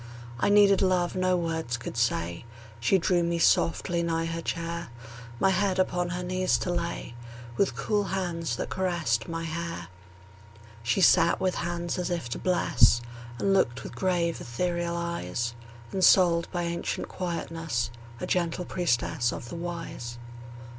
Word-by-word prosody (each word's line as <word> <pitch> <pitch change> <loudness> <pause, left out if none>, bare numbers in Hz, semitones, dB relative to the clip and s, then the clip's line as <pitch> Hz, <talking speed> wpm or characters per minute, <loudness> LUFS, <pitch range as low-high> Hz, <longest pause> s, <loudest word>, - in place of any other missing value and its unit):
I - - +2
needed 205 -1 +6
love 185 -2 +2
no 185 0 +2
words 160 -8 -2
could 120 - -7
say; 85 -8 0 0.4
She 120 +11 +3
drew 180 0 +2
me 170 0 0
softly 170 +1 +2
nigh 165 -1 0
her 165 0 -3
chair, 170 0 -3 0.5
My 195 - +4
head 190 0 +1
upon 180 -1 +1
her 180 +1 -3
knees 185 +1 +1
to 180 - -2
lay, 170 -7 -3 0.4
With 190 -8 +1
cool 205 +10 0
hands 170 -8 -2
that - - -4
caressed 170 -11 0
my 165 0 -3
hair. 165 - -4 0.9
She 120 +11 +1
sat 170 -1 +5
with 185 -1 +1
hands 175 +1 -2
as 180 - -1
if 170 -9 -2
to - - -4
bless, 135 -10 +4 0.4
And 195 +8 +2
looked 130 -10 +1
with - - -8
grave, 175 -3 0
ethereal 170 +6 -2
eyes; 170 -9 -2 0.4
Ensouled 180 -3 +5
by 175 -1 -1
ancient 170 0 -2
quietness, 165 -8 -3 0.3
A - - -3
gentle 175 0 0
priestess 120 -9 0
of 120 - -7
the - - -6
Wise. 165 -9 -5
170 Hz, 150 wpm, -28 LUFS, 160-180 Hz, 0.9 s, needed